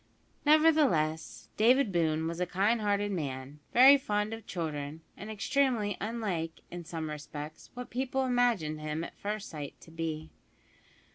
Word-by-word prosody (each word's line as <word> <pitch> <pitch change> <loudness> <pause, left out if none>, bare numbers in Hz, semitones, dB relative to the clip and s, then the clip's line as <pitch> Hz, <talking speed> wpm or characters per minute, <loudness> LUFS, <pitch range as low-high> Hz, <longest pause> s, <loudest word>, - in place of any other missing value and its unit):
Nevertheless, 295 - +3
David 245 +1 +4
Boone 160 -2 +1
was 165 +1 -3
a 180 - 0
kind 205 +6 +1
hearted 205 0 +1
man, 140 -4 -4
very 270 +3 +8
fond 210 -3 -1
of 225 0 -8
children, 155 -3 -4
and 210 - -8
extremely 220 -1 +1
unlike, 200 -8 -3
in 175 0 -6
some 160 -1 -4
respects, 150 0 -7
what 250 0 -7
people 265 +1 -1
imagined 235 -12 +1
him 155 +1 -3
at - - -8
first 210 0 -3
sight 150 -4 -7
to 165 - -14
be. 160 -1 -4
190 Hz, 145 wpm, -30 LUFS, 155-235 Hz, -, very